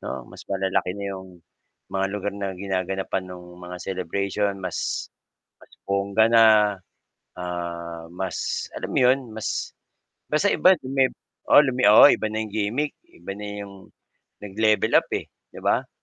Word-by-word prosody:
'no, 65 -2 -6
mas - - -12
malalaki 95 -1 0
na 100 - -5
'yong, 95 -1 -8 0.6
mga 95 0 -1
lugar 105 0 -3
na 100 -1 -3
ginaganapan 95 -1 -3
ng 90 -1 -9 0.2
mga 90 0 -7
celebration 100 +3 -2
mas, 90 -3 -3 0.5
mas - - -21 0.2
bongga 100 +2 +2
na, 115 -1 +6 0.9
ah, 85 -2 -5
mas 95 0 -3
alam - - -5
mo - - +2
yun, 130 +2 +5 0.2
mas 110 - -3 0.6
basta 155 +7 +2
iba 185 +1 +5
lumib 130 -1 +1 0.4
oo - - +8
lumi 130 -2 0
oo 105 - +9
iba - - 0
na 110 +1 -2
yung 105 - -10
gimik, 110 +8 -1 0.2
iba 340 - -9
na 105 +1 -7 0.2
yung, 100 -1 -14 0.6
nag-level 105 +2 +1
up - - -18
eh, - - -6 0.3
'di - - -10
ba? - - +1
100 Hz, 150 wpm, -24 LUFS, 95-110 Hz, 0.9 s, oo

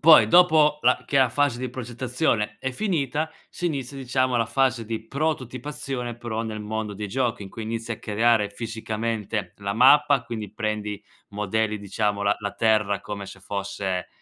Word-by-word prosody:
Poi 160 0 +8
dopo 155 -4 +5
la 125 +1 +3
che 140 - 0
la 130 -2 +5
fase 130 0 +1
di 130 -1 -3
progettazione 120 -2 -1
è 130 +3 -3
finita, 155 - -1 0.2
si 175 - -4
inizia 140 -4 -3
diciamo 130 -1 0
la 115 - +3
fase 120 0 +1
di 110 0 -5
prototipazione 130 -3 -3
però 115 -2 -3
nel 110 -1 -4
mondo 105 0 -3
dei 105 +1 -5
giochi, 120 -1 -1
in - - -9
cui 115 - -7
inizi 115 +1 -3
a 110 - -6
creare 110 0 +2
fisicamente 110 -3 -3
la 100 0 -3
mappa, 135 +2 +6
quindi 110 -4 -6
prendi 105 -2 -3 0.3
modelli 105 +1 -1
diciamo 100 0 -1
la 100 0 +3
la 100 -1 -2
terra 105 -3 +2
come 100 -1 -6
se 95 - -10
fosse 95 -2 -3
115 Hz, 170 wpm, -25 LUFS, 105-130 Hz, 0.3 s, Poi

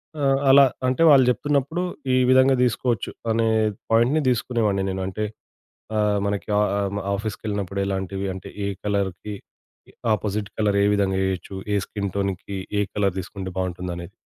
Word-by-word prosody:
ఆ! 150 - -5 0.3
అలా 140 +1 +8 0.2
అంటే 130 +4 0
వాళ్ళు 135 -3 +7
చెప్తున్నప్పుడు 145 +5 0 0.3
ఈ - - +4
విధంగా 130 +1 +5
తీసుకోవచ్చు. 120 -2 0 0.2
అనే 115 0 +2 0.4
పాయింట్‌ని 120 +7 +4
తీసుకునే 120 0 0
వాడిని 100 -1 0
నేను. 95 0 -3
అంటే, 100 +3 -3 0.7
ఆహ్, 105 -1 +2
మనకి 100 0 -2
ఆహ్, 105 - +3 0.2
హ్మ్, 100 +1 -3
ఆఫీస్‌కెళ్ళినప్పుడు 100 -2 -4
ఎలాంటివి 95 0 -3
అంటే, 95 - -8 0.2
ఏ - - -1 0.2
కలర్‌కి 100 0 -2 0.8
అపోజిట్ 105 0 -3
కలర్ 105 -2 +2
ఏ - - +4
విధంగా 95 -2 +1
ఏయొచ్చు. 95 +1 -4 0.2
ఏ - - +3
స్కిన్ 100 -2 -4
టోన్‌కి 100 0 -2 0.2
ఏ - - +3
కలర్ 100 -2 +1
తీసుకుంటే 95 +1 -6
బాగుంటుందనేది. 90 -1 -4
100 Hz, 145 wpm, -23 LUFS, 95-115 Hz, 0.8 s, అలా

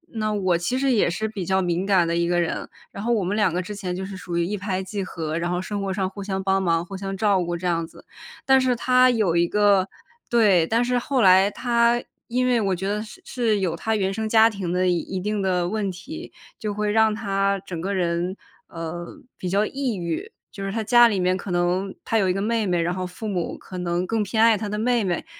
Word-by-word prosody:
那 215 -1 -1
我 185 -4 +1
其 175 +10 -1
实 270 0 +1
也 210 -7 +3
是 215 +5 -2
比 205 -4 -5
较 190 +1 +2
敏 175 +1 -1
感 180 -4 +4
的 170 - 0
一 170 0 +1
个 175 0 +1
人， 170 - -2 0.2
然 200 - -7
后 240 - 0
我 210 -4 +1
们 195 +4 -1
两 210 -5 +2
个 180 - 0
之 205 +3 -7
前 185 -3 -4
就 190 +1 -4
是 195 0 -7
属 175 -1 -5
于 170 - +1
一 205 +3 -2
拍 190 -1 -2
即 195 +1 -4
合， 160 -3 -4
然 175 +1 -2
后 180 0 -1
生 200 +1 -4
活 195 -1 -2
上 190 -1 -1
互 200 0 -8
相 190 -1 -3
帮 195 0 +2
忙 170 -2 +1
互 195 - -8
相 195 0 -5
照 200 -4 +2
顾 175 0 -3
这 180 - -7
样 165 -1 0
子。 - - -17 0.4
但 265 0 +5
是 255 -1 +2
她 255 +1 +4
有 210 -8 +1
一 170 0 +4
个 200 -1 +3 0.4
对， 205 -8 +4
但 230 +2 +2
是 250 0 +1
后 260 0 0
来 190 +1 +6
她， 235 +1 +1 0.2
因 250 +1 0
为 245 -2 +2
我 195 -2 +1
觉 190 +2 -4
得 210 +1 -1
是 215 - -11
是 225 -5 0
有 175 -3 -1
她 220 +6 -1
原 195 -1 0
生 220 +1 -3
家 225 0 +6
庭 190 -4 -4
的 180 0 +1
一 180 +2 -1
定 210 +2 -2
的 180 -2 +1
问 210 -1 -1
题， 280 - -8 0.3
就 210 -1 -3
会 210 0 0
让 220 -1 +3
她 195 -2 0
整 170 -4 -5
个 200 +2 -2
人， 175 +1 -1 0.3
呃， 170 +1 -7 0.2
比 180 - -5
较 200 +3 +2
抑 265 -4 -2
郁。 170 -2 -4 0.2
就 195 - -7
是 195 - -3
她 225 +1 -2
家 240 +2 +6
里 205 -4 0
面 185 0 +2
可 190 - -7
能 180 +2 0
她 225 - +1
有 190 -3 +2
一 - - +2
个 195 - -2
妹 220 +1 0
妹， 175 -2 +1
然 170 +1 0
后 185 0 -3
父 200 +5 -7
母 180 -5 -2
可 185 -1 -9
能 175 +1 -1
更 225 +2 -1
偏 220 +3 +1
爱 230 -1 +6
她 210 0 -4
的 210 - -3
妹 235 +1 +1
妹， 180 - -2
195 Hz, 275 characters per minute, -23 LUFS, 180-220 Hz, 0.4 s, 来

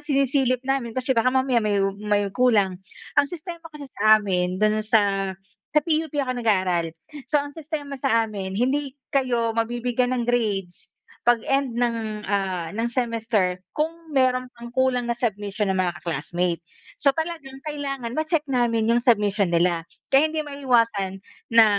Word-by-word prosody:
sinisilip 270 -3 +1
namin 265 -4 -1
kasi 255 +1 +1
baka 230 +1 +3
mamaya 260 -2 +2
may 210 -1 +1 0.3
may 205 -1 +2
kulang. 205 -7 +3 0.4
Ang 285 - +5
sistema 340 0 -7
kasi 295 -2 -9
sa 215 0 +6
amin, 180 -3 -1
do'n 215 +1 +2
sa 200 -3 +2 0.4
sa 300 - +8
PUP 315 -2 0
ako 255 -1 -3
nag-aaral. 185 -7 +2 0.4
So, 300 - +2
ang 285 0 -1
sistema 290 -3 -6
sa 230 -1 +3
amin, 195 -3 -5
hindi 270 +3 0 0.2
kayo 240 -4 +1
mabibigyan 240 +2 0
ng 240 - -1
grades 210 -7 0 0.5
pag-end 240 +2 +2
ng, 225 -3 -1
ah, 185 -4 -1
ng 225 +5 -1
semester 230 -6 0 0.2
kung 320 0 -3
meron 255 -1 +3
pang 235 0 -10
kulang 250 -1 +1
na - - +4
submission 205 -2 -1
ng 190 - +1
mga 180 -2 0
ka-classmate. 170 +2 -2 0.4
So, 280 - +6
talagang 320 -4 -5
kailangan 275 -5 -4
ma-check 310 0 0
namin 240 -4 +1
'yong 235 +1 +3
submission 205 -4 +3
nila. 170 -1 +2 0.2
Kaya 285 +3 +4
hindi 315 - -1
maiiwasan 230 -9 +1 0.3
na 230 -1 +8
235 Hz, 150 wpm, -24 LUFS, 205-270 Hz, 0.5 s, sa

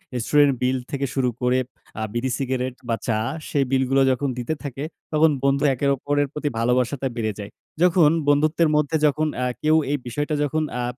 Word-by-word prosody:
Restaurant 140 +3 +3
বিল 130 +1 +1
থেকে 140 -1 -1
শুরু 130 -2 +2
করে 125 +1 +2 0.4
আ - - -3
বিড়ি, 125 +2 -1
সিগারেট 130 -1 -2
বা 115 - +2
চা 110 -2 +1 0.3
সেই 140 -2 +1
বিল 130 0 +3
গুলো 135 0 +3
যখন 135 +2 -1
দিতে 125 +6 -2
থাকে। 140 0 -5 0.3
তখন 155 0 +4
বন্ধু 140 +1 +2
একের 140 +2 0
ওপরের 145 +1 0
প্রতি 150 -1 -2
ভালোবাসাটা 125 +3 +1
বেড়ে 110 -2 -2
যায়। 100 - -7 0.3
যখন 175 -4 +5 0.2
বন্ধুত্বের 155 +2 +3
মধ্যে 150 +1 +1
যখন 150 +2 +2 0.2
আ - - +1 0.2
কেউ 155 +1 +4 0.2
এই 145 - +1
বিষয়টা 145 +5 -2
যখন 155 +2 0 0.2
আ - - -2
140 Hz, 185 wpm, -23 LUFS, 125-150 Hz, 0.4 s, যখন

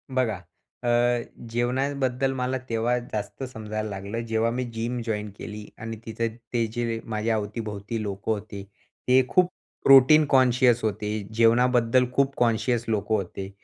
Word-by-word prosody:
बघा, 120 -5 +1 0.5
अ, 120 - 0 0.6
जेवणाबद्दल 130 +2 0
मला 130 0 -1
तेव्हा 115 +2 +1
जास्त 110 +2 -5
समजायला 110 0 -4
लागलं, 100 +3 -5
जेव्हा 115 0 +1
मी 125 +2 -2
जिम 120 +2 -2
जॉइन्ड 105 -2 -3
केली 105 0 -7
आणि 110 0 -6
तिथं 115 0 -3 0.2
ते 115 -1 +2
जे 115 -2 -2
माझ्या 110 0 -1
अवती-भोवती 105 +1 -4
लोकं 100 +1 -3
होते, 105 -2 -4 0.4
ते 130 +1 +5
खूप 180 -1 +4 0.4
प्रोटीन 135 +3 +8
कॉन्शियस 125 -2 +4
होते. 105 0 -1
जेवणाबद्दल 120 +2 +4
खूप 140 +1 +1
कॉन्शियस 120 0 +1
लोकं 110 0 0
होते. 95 -1 -4
115 Hz, 135 wpm, -25 LUFS, 110-125 Hz, 0.6 s, प्रोटीन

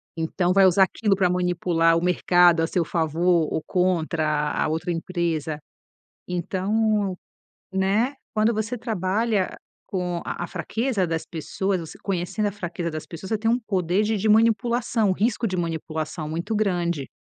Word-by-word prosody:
Então, 175 +2 0
vai 195 0 +6
usar 190 +1 +6
aquilo 200 +2 +1
pra 185 -2 +2
manipular 175 -2 +2
o 165 - -1
mercado 175 -1 +4
a 165 - +1
seu 175 +1 0
favor 165 +1 +1
ou 160 - -2
contra 160 -4 0
a - - 0
outra 160 +3 -2
empresa. 165 -3 -2 0.7
Então, 195 +3 0 0.6
né, 200 +7 +1 0.2
quando 215 +2 +2
você 220 +3 -2
trabalha 215 -1 -1 0.3
com 180 -2 -2
a - - -4
a - - -4
fraqueza 225 0 -1
das 160 -1 -2
pessoas, 185 +4 -2
você 165 -2 -9
conhecendo 195 +3 -1
a - - -1
fraqueza 175 -3 -4
das 155 0 -5
pessoas, 175 +3 -8
você 220 - +2
tem 225 +2 0
um 235 - +3
poder 190 -3 0
de 215 0 0
de 215 +2 0
manipulação, 230 0 +3
um - - +3
risco 225 +4 0
de 185 -2 -3
manipulação 160 -2 -3
muito 170 +8 -2
grande. 175 -8 0
180 Hz, 160 wpm, -24 LUFS, 165-210 Hz, 0.7 s, vai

